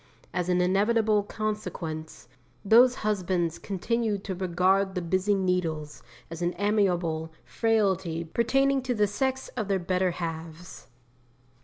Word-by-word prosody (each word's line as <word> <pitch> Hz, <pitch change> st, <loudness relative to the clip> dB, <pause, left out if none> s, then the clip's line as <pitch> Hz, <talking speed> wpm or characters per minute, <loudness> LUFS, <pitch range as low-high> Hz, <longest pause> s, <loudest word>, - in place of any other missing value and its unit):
As 180 Hz, 0 st, -1 dB
an 180 Hz, 0 st, +3 dB
inevitable 210 Hz, +3 st, +2 dB
consequence, 200 Hz, -7 st, -5 dB, 0.4 s
those 245 Hz, +4 st, +6 dB
husbands 180 Hz, -5 st, 0 dB
continue 215 Hz, +2 st, -1 dB
to 195 Hz, 0 st, -5 dB
regard 185 Hz, +2 st, +1 dB
the 180 Hz, -, -1 dB
busy 185 Hz, +4 st, +1 dB
needles 170 Hz, -6 st, -1 dB, 0.3 s
as 165 Hz, +1 st, -7 dB
an 175 Hz, 0 st, -1 dB
amiable 180 Hz, -6 st, 0 dB
frailty 190 Hz, -7 st, 0 dB
pertaining 270 Hz, +10 st, +1 dB
to 250 Hz, -1 st, -2 dB
the 210 Hz, -1 st, +3 dB
sex 265 Hz, +6 st, -2 dB
of 220 Hz, -5 st, -4 dB
their 195 Hz, -1 st, +1 dB
better 185 Hz, +1 st, 0 dB
halves. 165 Hz, 0 st, -7 dB
190 Hz, 125 wpm, -27 LUFS, 175-215 Hz, 0.4 s, those